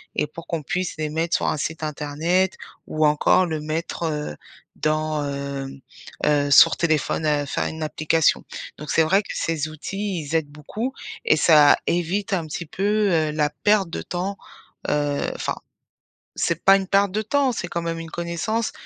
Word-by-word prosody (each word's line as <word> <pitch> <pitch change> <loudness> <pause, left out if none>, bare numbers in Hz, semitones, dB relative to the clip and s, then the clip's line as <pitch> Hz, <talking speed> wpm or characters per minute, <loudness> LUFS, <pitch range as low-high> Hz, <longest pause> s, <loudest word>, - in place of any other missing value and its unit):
et - - +1
pour 165 +3 -11
qu'on 165 -3 -3
puisse 180 +5 -2
les 155 -1 -2
mettre 165 +2 0
sur - - 0
un - - 0
site 160 +2 -4
internet 155 +5 0 0.3
ou 155 0 +1
encore 150 +5 +4
le 160 -2 -3
mettre, 155 +3 -4
heu, 150 - -2 0.4
dans 155 -1 0
hem, 140 -1 -5 0.5
heu, 145 -1 +2
sur - - +7
téléphone, 160 -1 0
heu, 145 -1 +1
faire - - -2
une 160 0 -5
application. 155 +1 +1 0.3
Donc 150 - -9
c'est 160 - +4
vrai 190 +6 +3
que - - -16
ces 160 -2 -1
outils, 185 +4 -4
ils 150 +2 -4
aident 160 -3 +1
beaucoup, 210 - -5 0.3
et 455 - +5
ça 150 -3 +6
évite 180 +5 -1
un 170 -4 0
petit 170 +3 -5
peu, 205 +5 +1
heu, 155 -2 +2
la 150 -1 +1
perte 195 +4 +2
de - - -4
temps 185 +3 -4 0.5
heu, 145 -1 0 0.2
enfin, - - -2 0.8
c'est 170 0 -1
pas 195 0 +8
une 195 -1 -2
perte 195 0 +2
de 215 +1 0
temps, 270 +4 +1
c'est 180 -6 -4
quand 170 0 -3
même 165 0 -3
une 165 0 -7
connaissance, 175 +7 -2
160 Hz, 180 wpm, -23 LUFS, 150-185 Hz, 0.8 s, pas